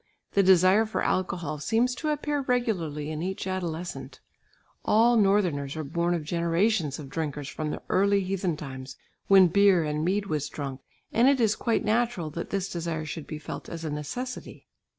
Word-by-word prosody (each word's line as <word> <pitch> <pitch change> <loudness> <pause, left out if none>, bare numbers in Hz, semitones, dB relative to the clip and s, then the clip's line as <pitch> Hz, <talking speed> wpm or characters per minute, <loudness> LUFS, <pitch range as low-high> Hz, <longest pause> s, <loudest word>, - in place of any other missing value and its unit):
The 200 - +4
desire 190 +3 +5
for 220 - -2
alcohol 175 -5 -1
seems 235 - +1
to 305 +5 -3
appear 295 -1 -1
regularly 180 - -1
in 155 0 -4
each 190 +2 -3
adolescent. 180 -2 -4 0.6
All 230 +3 +4
northerners 185 -10 +2
are 155 - -2
born 170 +4 0
of 165 - -3
generations 170 0 +1
of 150 - -8
drinkers 145 -1 -4
from 155 +1 -4
the - - -5
early 200 +1 +3
heathen 185 -3 -1
times, 130 -2 -8 0.3
when 195 -1 +8
beer 195 -1 +4
and 150 0 -2
mead 195 +4 0
was 150 -5 -2
drunk, 135 -2 -6 0.3
and 235 +3 +4
it 280 -2 +3
is 220 -3 +3
quite 230 -2 0
natural 215 -7 0
that 170 +3 -5
this 195 -1 -1
desire 165 -3 -3
should 155 0 -6
be 155 - -5
felt 150 - -7
as 165 -1 -6
a 155 - -3
necessity. 245 - -6
175 Hz, 175 wpm, -27 LUFS, 155-205 Hz, 0.6 s, when